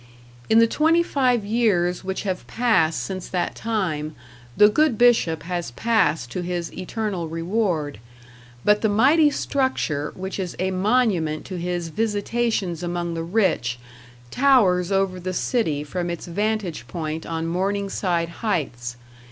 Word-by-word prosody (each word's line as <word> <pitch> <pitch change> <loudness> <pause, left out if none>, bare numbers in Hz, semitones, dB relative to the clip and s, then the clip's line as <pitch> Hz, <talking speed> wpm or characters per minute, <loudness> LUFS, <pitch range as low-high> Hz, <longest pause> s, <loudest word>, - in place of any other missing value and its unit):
In 220 - +5
the 230 - +7
twenty 320 +8 +3
five 250 -8 +1
years 200 -6 +1
which 190 0 -3
have 190 -3 -3
passed 185 -10 +2
since 185 -2 -5
that 180 -2 -1
time 170 -9 -2 0.4
the 210 - +8
good 255 +2 +2
Bishop 225 -10 +3
has 175 -2 -3
passed 160 - +1
to 180 - -3
his 175 -1 -3
eternal 190 -2 -3
reward, 165 - -1 0.7
but 210 0 +4
the 220 - +2
mighty 280 +9 +5
structure 260 - -1
which 190 +2 -5
is 180 -2 -4
a 190 +1 -1
monument 185 -6 +1
to 185 -2 -5
his 175 -1 -3
visitations 210 -2 -1
among 175 -1 -2
the 165 - -3
rich 165 - 0 0.5
towers 205 -10 +3
over 195 -1 +1
the 185 +1 -4
city 165 - 0
from 175 +4 -3
its 170 -1 -5
vantage 195 - -2
point 160 -1 -4
on 165 0 -3
Morningside 185 -1 -1
Heights. 135 - -3
185 Hz, 140 wpm, -23 LUFS, 165-220 Hz, 0.7 s, the